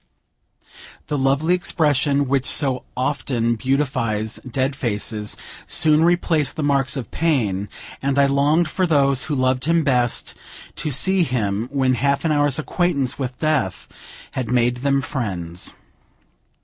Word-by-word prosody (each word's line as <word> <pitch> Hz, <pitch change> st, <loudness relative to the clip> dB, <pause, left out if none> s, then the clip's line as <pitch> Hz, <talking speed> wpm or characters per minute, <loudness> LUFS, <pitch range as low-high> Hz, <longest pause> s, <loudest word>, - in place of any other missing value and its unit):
The 150 Hz, -, 0 dB
lovely 140 Hz, +6 st, +2 dB
expression 145 Hz, -5 st, +1 dB
which 135 Hz, 0 st, 0 dB
so 135 Hz, -4 st, -1 dB
often 125 Hz, -3 st, 0 dB
beautifies 130 Hz, -4 st, -1 dB
dead 130 Hz, +2 st, -1 dB
faces, 105 Hz, -4 st, -3 dB, 0.3 s
soon 155 Hz, 0 st, +3 dB
replaced 165 Hz, -4 st, +2 dB
the 155 Hz, -, -3 dB
marks 140 Hz, -1 st, +1 dB
of 120 Hz, -7 st, -6 dB
pain, 110 Hz, -, 0 dB, 0.3 s
and 140 Hz, 0 st, 0 dB
I 140 Hz, -, +5 dB
longed 145 Hz, +5 st, +2 dB
for 185 Hz, +3 st, 0 dB
those 140 Hz, -4 st, +2 dB
who 150 Hz, -, -2 dB
loved 130 Hz, 0 st, +1 dB
him 165 Hz, 0 st, +2 dB
best 125 Hz, -4 st, 0 dB, 0.4 s
to 155 Hz, -, -2 dB
see 190 Hz, +7 st, +2 dB
him 115 Hz, -, -1 dB
when 135 Hz, -2 st, +2 dB
half 140 Hz, +4 st, 0 dB
an 160 Hz, -, +2 dB
hour's 145 Hz, -2 st, +2 dB
acquaintance 150 Hz, -5 st, -1 dB
with 130 Hz, -2 st, -4 dB
Death 145 Hz, -, -1 dB, 0.4 s
had 125 Hz, -4 st, -4 dB
made 125 Hz, 0 st, +2 dB
them 140 Hz, +1 st, +1 dB
friends. 90 Hz, -, -4 dB
135 Hz, 135 wpm, -21 LUFS, 125-150 Hz, 0.4 s, I